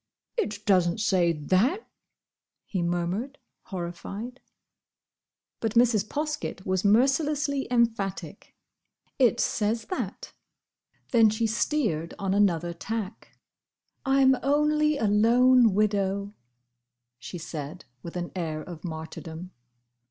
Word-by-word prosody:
"It 215 - -3
doesn't 180 -3 +3
say 185 -5 +2
that!" 185 - +1 0.8
he 185 - -3
murmured, 175 +10 -2 0.3
horrified. 195 +7 -6 1.2
But 225 -1 -2
Mrs. 230 -4 +4
Poskett 300 -9 -3
was 185 -1 0
mercilessly 275 +6 +2
emphatic. 230 -5 -1 0.6
"It 245 -2 +4
says 215 +1 0
that." 370 - -4 0.8
Then 230 -3 +6
she 215 +2 -1
steered 220 - -1
on 195 -1 -1
another 175 -4 +2
tack. 215 +3 -6 0.7
"I 270 0 +3
'm 265 0 +6
only 300 +2 +2
a 225 - 0
lone 230 +2 +5
widow," 200 -1 0 0.9
she 175 - -7
said, 160 0 -7 0.2
with 170 - -9
an 175 -1 -4
air 160 -4 -3
of 170 -2 -10
martyrdom. 160 +1 -7
210 Hz, 105 wpm, -27 LUFS, 175-250 Hz, 1.2 s, Then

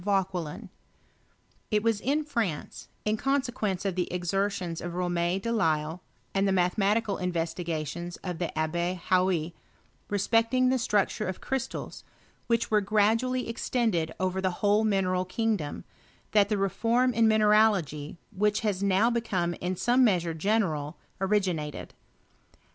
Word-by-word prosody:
Vauquelm. 190 -1 -1 1.0
It 210 0 +1
was; 225 -3 +1
in 290 +4 +1
France, 225 - -3 0.2
in 215 +1 +1
consequence 245 -8 -1
of 195 - 0
the 180 0 -2
exertions 180 -1 -1
of 175 0 -5
Rom6 175 +1 -1
de 230 - -1
lisle, 160 -5 0 0.3
and 195 0 +2
the - - +2
mathematical 200 +3 +1
investigations 170 -1 -3
of 180 -3 -4
the 175 -3 -1
Abbe 170 +3 0
Hauy, 180 -3 +2 0.6
respecting 230 +5 +2
the 260 0 +2
structure 210 -6 0
of 185 - -4
crystals,, 265 -2 -4 0.4
which 230 -1 +1
were 210 -1 +4
gradually 220 +5 +1
extended 225 -8 0
over 185 0 -1
the 190 - +1 0.2
whole 205 +2 +4
mine 200 -3 +2
Tai 185 0 0
kingdom, 200 -6 -2 0.5
that 205 -1 +4
the 210 - +1
reform 230 +6 +1
in 225 0 +4
mineralogy, 210 -9 +3 0.2
which 210 +2 +1
has 205 -4 -1
now 200 +4 +3
become 190 -7 -1
in 180 +1 -1
some 245 +7 +3
measure 175 -7 +2
general, 160 -5 0 0.2
originated.. 185 -7 -1
195 Hz, 135 wpm, -28 LUFS, 175-220 Hz, 1.0 s, were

